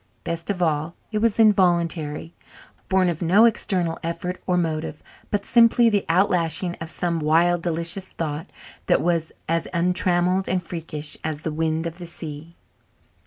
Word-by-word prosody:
Best 170 +2 -4
of 180 -3 0
all, 155 0 0 0.2
it 215 - 0
was 230 -1 +2
involuntary, 170 -7 +2 0.6
born 190 -1 +3
of 170 -3 -2
no 190 +7 +5
external 185 -7 0
effort 180 +2 -4
or 180 -1 +2
motive, 160 -2 -2 0.3
but 205 -1 -1
simply 235 0 +5
the 205 -2 +1
outflashing 175 -1 +1
of 160 - -5
some 170 -1 -1
wild, 165 +3 +3
delicious 170 +3 -2
thought 155 +2 -4 0.4
that - - +3
was 165 -2 0 0.2
as 165 0 0
untrammelled 180 +1 +1
and 185 0 0
freakish 155 -3 -6
as 155 -2 -3
the 160 -1 -3
wind 160 +1 -1
of 170 +1 -5
the 175 - -7
sea. 165 0 -7
170 Hz, 155 wpm, -23 LUFS, 160-185 Hz, 0.6 s, no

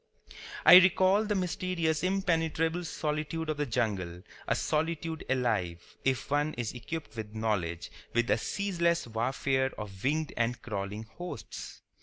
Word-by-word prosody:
I - - +12
recall 190 +3 +4
the 210 -1 0
mysterious 175 -3 0
impenetrable 165 -3 +1
solitude 155 0 -2
of 155 - -4
the 145 -1 -1
jungle, 95 -7 -1 0.2
a - - +2
solitude 160 +1 -1
alive, 105 -10 -1
if 130 -1 0
one 145 +1 +1
is 120 -3 -3
equipped 145 +5 -6
with 110 -1 -6
knowledge, 95 -7 -1 0.2
with 120 -2 +1
a 105 - +4
ceaseless 170 - 0
warfare 130 +3 0
of 100 -3 -8
winged 155 +3 0
and 120 +1 0
crawling 105 -1 -4
hosts. 175 +11 -8
145 Hz, 135 wpm, -30 LUFS, 110-165 Hz, 0.2 s, I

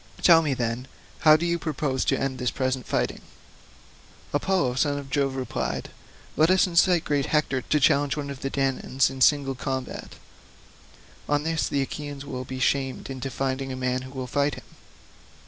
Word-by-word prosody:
Tell 165 -2 +8
me, 145 -4 0
then, 120 +1 -2 0.3
how 155 -1 +7
do 170 - -2
you 170 0 0
propose 145 -4 -1
to - - +1
end 135 -2 -2
this 125 -1 0
present 130 -1 -2
fighting?" - - -1 1.1
Apollo, 145 -4 +1
son 145 +3 +1
of 140 -2 -8
Jove, 135 -1 +1
replied, 130 -1 -3 0.4
"Let 155 +2 +4
us 185 0 +5
incite 175 -1 +3
great 145 -2 0
Hector 150 -4 +1
to 150 - +1
challenge 145 -1 +3
some 150 - -3
one 140 - -6
of 135 - -8
the 135 - -2
Danaans 135 -1 0
in 135 -1 -8
single 140 0 +4
combat; 130 0 -5 1.1
on 145 0 +2
this 160 0 0
the 140 -1 +1
Achaeans 145 0 -6
will 130 -2 -5
be 130 0 -6
shamed 135 0 0
into 135 0 -4
finding 135 0 -2
a - - -4
man 130 0 -1
who 130 - -9
will 130 -2 -5
fight 140 +3 0
him." - - -11
135 Hz, 180 wpm, -25 LUFS, 130-150 Hz, 1.1 s, Tell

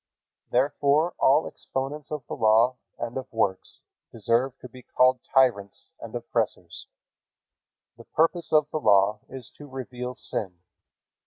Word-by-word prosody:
Therefore 145 +5 +2
all 145 +4 +4
exponents 140 +2 -5
of 150 -5 -5
the - - -5
Law 115 +4 +3 0.2
and 120 0 -5
of 130 0 -6
works 100 -5 -2 0.3
deserve 115 +4 0
to - - -11
be 125 +1 -14
called 125 +1 +3
tyrants 115 -7 +1
and - - -9
oppressors. - - -3 1.1
The - - -13
purpose 165 +1 0
of 155 -1 +4
the 155 - -1
Law 100 -4 +4
is 130 -3 -8
to 145 - -10
reveal 125 -1 -6
sin. 95 -7 -4
130 Hz, 135 wpm, -26 LUFS, 115-140 Hz, 1.1 s, all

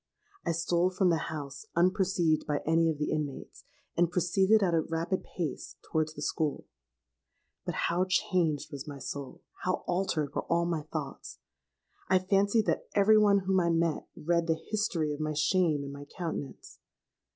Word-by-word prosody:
I - - 0
stole 170 +2 +1
from 185 -1 +2
the 160 -4 -1
house, 145 +5 -6
unperceived 180 -2 +2
by 145 -1 0
any 165 +1 +3
of 155 - -1
the 150 - -1
inmates, 150 -3 -4 0.3
and 175 -1 +3
proceeded 190 +4 +3
at 175 -3 +2
a 165 - +3
rapid 165 +4 -2
pace 165 -6 -5
towards 155 -1 -1
the 145 - -5
school. 155 -1 -1 1.0
But - - -2
how 180 +2 +1
changed 170 -5 +1
was 140 0 -7
my 145 -1 -6
soul—how 140 +6 -5
altered 170 -6 -1
were - - -2
all 170 0 +2
my 170 -2 -1
thoughts! 145 -4 -5 0.7
I 185 - +5
fancied 200 +4 +2
that - - -1
every 210 +1 +6
one 200 -2 +5
whom 190 0 +3
I 170 -1 +2
met, 165 -1 +1
read 170 +1 0
the 160 - +3 0.2
history 175 -8 0
of 145 - -7
my 155 0 -1
shame 155 -1 +2
in 140 - -6
my 140 0 -8
countenance! 160 -3 -6
170 Hz, 165 wpm, -30 LUFS, 155-185 Hz, 1.0 s, every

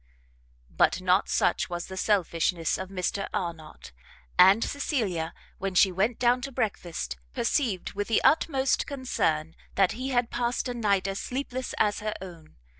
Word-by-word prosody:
But - - +3
not - - +2
such - - +1
was 175 -1 -4
the 190 - -8
selfishness 175 -4 +1
of 190 0 -5
Mr 195 +1 -2
Arnott; 165 -4 -5 0.4
and 195 +5 +7
Cecilia, 210 - -1 0.3
when 195 -1 -3
she 190 +1 +6
went 210 +6 0
down 245 +1 +3
to 275 - -5
breakfast, 175 - -3 0.2
perceived 225 - 0
with 205 0 -3
the 225 - +2
utmost 275 -3 +2
concern 165 - -1 0.2
that 195 -1 +4
he 255 +3 -4
had 245 -2 +1
passed 240 +1 -1
a 245 - -2
night 200 -5 +1
as 195 0 -3
sleepless 255 -1 -4
as 210 -1 +2
her 215 0 -3
own. 170 -4 -11
200 Hz, 155 wpm, -27 LUFS, 180-245 Hz, 0.4 s, and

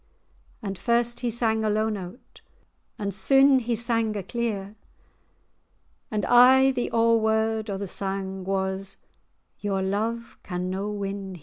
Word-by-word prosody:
And 195 -2 -5
first 235 +2 +1
he 245 - -1
sang 220 -1 0
a 215 - +1
low 215 +1 +1
low 220 - 0
note, 195 +1 -8 0.6
And 200 -1 -3
syne[#] 270 +7 +5
he 235 0 -1
sang 230 -1 0
a 200 - -4
clear; 210 -3 -3 1.3
And 210 -2 -2
aye 260 +2 +6
the 250 -2 -2
o'erword[#] 220 -1 +2
o' 195 - -2
the 200 - -4
sang 195 0 -4
Was—"Your 190 +1 -5
love 225 +4 -3
can 180 -1 -4
no 195 +2 -3
win 200 -2 -5
here." - - -12
215 Hz, 140 wpm, -25 LUFS, 195-235 Hz, 1.3 s, aye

